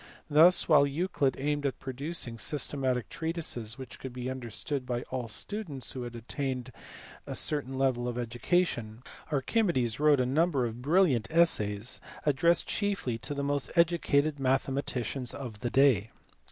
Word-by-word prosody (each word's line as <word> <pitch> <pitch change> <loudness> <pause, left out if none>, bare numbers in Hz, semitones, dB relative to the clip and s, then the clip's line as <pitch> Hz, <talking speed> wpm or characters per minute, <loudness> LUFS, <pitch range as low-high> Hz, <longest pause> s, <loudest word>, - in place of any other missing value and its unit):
Thus, 165 +4 +6
while 145 -3 +6
Euclid 140 -3 0
aimed 145 +1 -1
at 135 - -3
producing 135 -2 -4
systematic 130 -2 -1
treatises 160 -9 -3
which 130 -2 -9
could 130 -2 -7
be 125 +1 -4
understood 130 +2 -4
by 120 -1 -3
all 125 -2 -3
students 150 - -3
who 130 - -5
had 120 -1 -6
attained 130 +1 -4 0.6
a - - -4
certain 135 -3 0
level 130 -2 +1
of 120 -1 -3
education, 120 -1 -1 0.3
Archimedes 135 - +1
wrote 150 -2 +5
a 125 - +2
number 145 0 +2
of 115 +1 -5
brilliant 150 - +3
essays 115 -10 +1 0.3
addressed 165 +4 +3
chiefly 200 - -1
to 145 +6 -5
the 140 - -2
most 140 -1 -1
educated 155 -4 +2
mathematicians 135 -1 -1
of 120 -7 -7
the 120 - -2
day. 125 -6 +4
135 Hz, 145 wpm, -30 LUFS, 120-150 Hz, 0.6 s, Thus